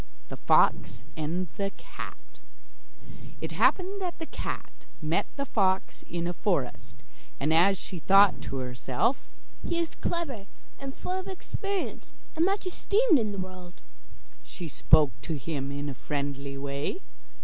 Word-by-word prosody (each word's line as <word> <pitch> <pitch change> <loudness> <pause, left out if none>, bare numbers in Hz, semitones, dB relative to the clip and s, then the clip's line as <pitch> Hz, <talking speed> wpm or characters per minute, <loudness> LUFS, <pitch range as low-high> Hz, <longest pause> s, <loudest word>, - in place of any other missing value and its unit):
THE - - -6
FOX - - +3
AND 165 +4 -1
THE 195 0 0
CAT - - -8 1.2
It - - -4
happened 390 +2 +2
that 360 -2 -3
the 325 - -5
cat - - -6
met 155 +2 0
the 280 - -2
fox 190 -6 +1
in 170 0 -2
a 175 - -1
forest, 170 - -1 0.4
and 150 +3 +2
as 185 +4 +5
she 180 - -1
thought 195 +3 +6
to - - -4
herself: 125 - 0 0.4
'He 340 - 0
is 335 -1 0
clever 275 - -2 0.3
and 275 -1 -6
full 370 +1 -2
of 375 - -7
experience, 395 +1 -4 0.2
and 325 +2 +3
much 390 +1 +1
esteemed 400 - +3
in 215 -2 0
the 200 - -5
world,' 185 -1 -7 0.6
she 175 - -6
spoke 150 -1 +5
to 160 -3 -1
him 140 -1 -3
in 145 +1 -3
a 140 - -3
friendly 140 0 -3
way. 140 - -2
185 Hz, 150 wpm, -29 LUFS, -, 1.2 s, thought